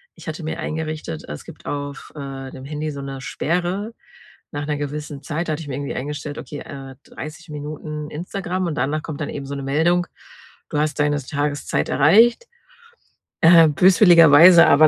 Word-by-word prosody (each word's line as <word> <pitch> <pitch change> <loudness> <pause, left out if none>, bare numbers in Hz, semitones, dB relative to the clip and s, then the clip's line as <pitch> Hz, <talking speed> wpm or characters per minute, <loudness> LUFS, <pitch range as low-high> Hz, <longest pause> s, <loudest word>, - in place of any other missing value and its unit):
Ich - - -14
hatte 155 +1 -5
mir 155 - -4
eingerichtet 155 - -4
es 75 - -7
gibt - - -13
auf, 145 0 -5
äh, 135 -1 -7
dem 130 0 -10
Handy 150 +1 -4
so 140 -1 -7
'ne 135 -1 -6
Sperre 180 - -2 0.6
nach 145 0 -4
'ner 150 - 0
gewissen 145 0 -5
Zeit. 165 +2 -3
Da 155 - 0
hatte 155 - -4
ich 150 - -9
mir 130 - -3
irgendwie 140 +1 -4
eingestellt: 145 +2 -5
„Okay, 145 - -7
äh, 135 -1 -9
30 160 +2 -9
Minuten 150 0 -6
Instagram“ 180 +2 -3
und 155 - -3
danach 145 +5 -1
kommt 155 -1 -6
dann 145 - -3
eben 140 -1 -6
so 140 +1 -5
'ne 140 - -5
Meldung: 170 +6 +2 0.6
„Du 150 - -3
hast 150 0 -1
deine 145 0 +2
Tageszeit 145 +1 -2
erreicht.“ 225 - +5 1.0
Äh, 165 -1 +8
böswilligerweise 170 -1 +7
aber 155 +2 +7
150 Hz, 180 wpm, -21 LUFS, 145-165 Hz, 1.0 s, Äh